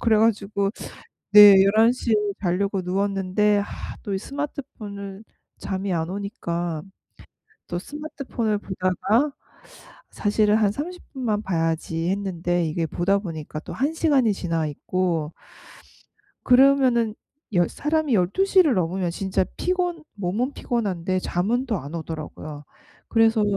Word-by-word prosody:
그래 225 Hz, -2 st, +3 dB
가지고 200 Hz, -2 st, +1 dB, 0.6 s
네. 205 Hz, -1 st, +11 dB
11:00 225 Hz, +4 st, +3 dB
에 -, -, +5 dB, 0.3 s
자려고 195 Hz, +2 st, 0 dB
누웠는데 195 Hz, +2 st, +1 dB
아 -, -, -2 dB, 0.4 s
또 195 Hz, -2 st, -2 dB
스마트폰을 215 Hz, -8 st, -6 dB, 0.4 s
잠이 190 Hz, -1 st, -3 dB
안 165 Hz, 0 st, -1 dB
오니까 175 Hz, -5 st, -3 dB, 0.9 s
또 175 Hz, -, -3 dB
스마트폰을 270 Hz, -, -3 dB
보다가 205 Hz, -, 0 dB, 0.8 s
사실은 210 Hz, 0 st, +2 dB
'한 205 Hz, -2 st, +3 dB
30 350 Hz, +9 st, -6 dB
분만 220 Hz, -5 st, -1 dB
봐야지.' 165 Hz, -1 st, -1 dB
했는데 175 Hz, -3 st, -1 dB
이게 165 Hz, +1 st, -1 dB
보다 195 Hz, +5 st, +1 dB
보니까 160 Hz, -5 st, -6 dB
또 -, -, -8 dB
1 285 Hz, +5 st, 0 dB
시간이 280 Hz, -9 st, +3 dB
지나 165 Hz, -4 st, -2 dB
있고 165 Hz, +1 st, -2 dB, 1.1 s
그러면은 250 Hz, -4 st, +4 dB, 0.4 s
여 175 Hz, -1 st, +3 dB
사람이 305 Hz, -3 st, 0 dB
12:00를 310 Hz, -, +3 dB
넘으면 180 Hz, 0 st, 0 dB
진짜 190 Hz, 0 st, 0 dB
피곤 355 Hz, -3 st, -1 dB
몸은 205 Hz, +7 st, -1 dB
피곤한데 185 Hz, -6 st, -1 dB
잠은 230 Hz, +11 st, -1 dB
또 220 Hz, -4 st, 0 dB
안 145 Hz, +3 st, -8 dB
오더라고요. 155 Hz, -2 st, -7 dB, 0.4 s
그래서 225 Hz, -1 st, +3 dB
200 Hz, 245 characters per minute, -24 LUFS, 175-235 Hz, 1.1 s, 네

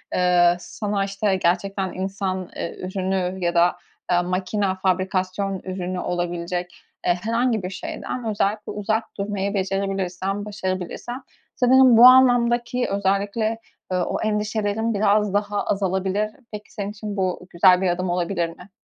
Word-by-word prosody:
ııı, 175 Hz, -1 st, +4 dB
sana, 200 Hz, +2 st, -3 dB
işte, 195 Hz, 0 st, 0 dB
gerçekten 185 Hz, +2 st, 0 dB
insan, 190 Hz, 0 st, -2 dB
ııı, 175 Hz, -2 st, -6 dB
ürünü 185 Hz, 0 st, -2 dB
ya 170 Hz, -, +1 dB
da, 170 Hz, +1 st, +4 dB, 0.4 s
eee, 175 Hz, -, +4 dB
makine, 185 Hz, +3 st, -1 dB, 0.2 s
fabrikasyon 185 Hz, +1 st, -1 dB
ürünü 185 Hz, -1 st, -4 dB
olabilecek, 175 Hz, 0 st, -3 dB, 0.2 s
eee, 175 Hz, -, +3 dB
herhangi 230 Hz, -1 st, +1 dB
bir 180 Hz, -, -3 dB
şeyden 230 Hz, +5 st, -5 dB
özellikle 210 Hz, 0 st, -1 dB
uzak 220 Hz, +2 st, -2 dB
durmayı 200 Hz, 0 st, -2 dB
becerebilirsen, 195 Hz, 0 st, -2 dB
başarabilirsen, 205 Hz, +5 st, -4 dB, 0.3 s
sanırım 255 Hz, -1 st, +6 dB
bu 240 Hz, -, +9 dB
anlamdaki 245 Hz, -1 st, +5 dB
özellikle, 200 Hz, +3 st, 0 dB, 0.3 s
ııı, 180 Hz, -1 st, +1 dB
o -, -, -3 dB
endişelerin 215 Hz, +1 st, -1 dB
biraz 210 Hz, 0 st, +2 dB
daha 205 Hz, 0 st, 0 dB
azalabilir. 195 Hz, +2 st, 0 dB, 0.2 s
Peki, 210 Hz, 0 st, -9 dB
senin 205 Hz, -1 st, -4 dB
için 210 Hz, -1 st, -6 dB
bu 185 Hz, -1 st, -2 dB
güzel 180 Hz, +1 st, +5 dB
bir 185 Hz, -, +2 dB
adım 180 Hz, +1 st, -1 dB
olabilir 175 Hz, -1 st, -1 dB
mi? 180 Hz, +3 st, -13 dB
195 Hz, 135 wpm, -23 LUFS, 185-210 Hz, 0.4 s, bu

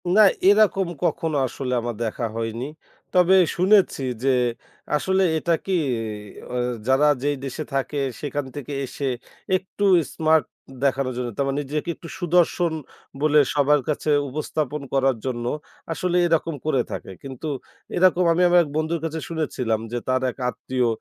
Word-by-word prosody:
না, 200 Hz, +5 st, +6 dB, 0.3 s
এরকম 200 Hz, -2 st, +5 dB, 0.2 s
কখনো 160 Hz, -3 st, 0 dB
আসলে 125 Hz, 0 st, -4 dB
আমার 120 Hz, 0 st, -3 dB
দেখা 115 Hz, +1 st, -2 dB
হয়নি। 115 Hz, +2 st, -3 dB, 0.5 s
তবে 180 Hz, 0 st, +5 dB, 0.2 s
শুনেছি 190 Hz, -4 st, +4 dB, 0.2 s
যে, 135 Hz, -, +3 dB, 0.7 s
আসলে 190 Hz, +5 st, +2 dB
এটা 170 Hz, +2 st, +1 dB
কি, 195 Hz, -, -1 dB, 0.8 s
আ -, -, -2 dB, 0.3 s
যারা 135 Hz, +3 st, +4 dB, 0.2 s
যেই 145 Hz, 0 st, +1 dB
দেশে 140 Hz, +3 st, -4 dB
থাকে, 135 Hz, +2 st, -1 dB, 0.2 s
সেখান 145 Hz, -1 st, -3 dB
থেকে 145 Hz, 0 st, -6 dB
এসে 140 Hz, +2 st, -5 dB, 0.5 s
একটু 190 Hz, +2 st, -4 dB, 0.3 s
স্মার্ট 160 Hz, -3 st, +3 dB, 0.4 s
দেখানোর 135 Hz, -1 st, +1 dB
জন্য, 125 Hz, -1 st, -2 dB
তারা 135 Hz, 0 st, +1 dB
নিজেকে 145 Hz, +3 st, -3 dB
একটু 165 Hz, -, -11 dB
সুদর্শন 175 Hz, -1 st, +2 dB, 0.5 s
বলে 150 Hz, 0 st, +5 dB, 0.2 s
সবার 145 Hz, 0 st, +4 dB
কাছে 150 Hz, +1 st, -1 dB, 0.2 s
উপস্থাপন 150 Hz, +1 st, -3 dB
করার 135 Hz, -1 st, +3 dB
জন্য 120 Hz, -2 st, -2 dB, 0.5 s
আসলে 180 Hz, +2 st, 0 dB
এরকম 165 Hz, -1 st, +1 dB
করে 135 Hz, -5 st, +2 dB
থাকে। -, -, -6 dB
কিন্তু 135 Hz, +2 st, -6 dB, 0.5 s
এরকম 180 Hz, 0 st, +4 dB
আমি 175 Hz, -, +1 dB
আমার 175 Hz, 0 st, +6 dB
এক 150 Hz, -, -7 dB
বন্ধুর 160 Hz, +2 st, 0 dB
কাছে 160 Hz, 0 st, -3 dB
শুনেছিলাম 130 Hz, -9 st, -1 dB
যে, 120 Hz, -, -1 dB
তার 130 Hz, 0 st, +2 dB
এক -, -, -21 dB
আত্মীয় 125 Hz, 0 st, -1 dB
150 Hz, 145 wpm, -23 LUFS, 130-170 Hz, 0.8 s, না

